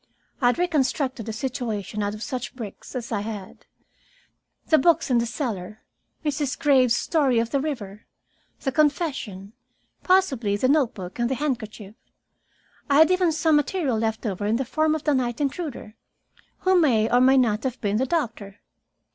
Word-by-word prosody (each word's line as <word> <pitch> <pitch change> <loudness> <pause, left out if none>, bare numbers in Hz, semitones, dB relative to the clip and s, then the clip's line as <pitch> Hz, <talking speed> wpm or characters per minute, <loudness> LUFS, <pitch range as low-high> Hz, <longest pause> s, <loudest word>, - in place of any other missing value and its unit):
I 245 - +4
had 245 - +2
reconstructed 270 - 0
a - - -1
situation 220 -4 -3
out 205 0 -2
of 215 - -7
such 255 -1 -5
bricks 230 +1 -9
as 245 -2 -5
I 210 -3 -1
had, 205 -3 -8 1.0
the 315 - +4
books 330 -1 +3
in 240 - +4
the 235 - -1
cellar, 215 - -5 0.4
Mrs. 290 -2 -1
Graves's 255 -5 +4
story 280 -7 +1
of 230 0 0
the 280 - +1
river, 225 -9 -5 0.5
the 270 - -1
confession, 270 - -1 0.5
possibly 270 - +2
the 255 - +1
note 275 -5 +2
book 185 +1 -8
and 240 0 +1
the 265 - 0
handkerchief. 220 -8 -4 1.0
I 280 - +3
had 315 +4 +6
even 365 -2 +3
some 315 0 +2
material 295 -2 0
left 220 +1 -2
over 205 -1 -2
in 220 - +2
the 265 +3 -1
form 310 +4 +1
of 315 - -5
the 300 - +2
night 245 -3 -1
intruder, 280 -6 -4 0.7
who 375 -1 +4
may 230 -9 +3
or 245 +2 +3
may 265 +1 +5
not 225 -4 +2
have 255 -1 -3
been 205 -1 0
the 260 +3 0
doctor. 225 - -3
255 Hz, 170 wpm, -24 LUFS, 220-295 Hz, 1.0 s, had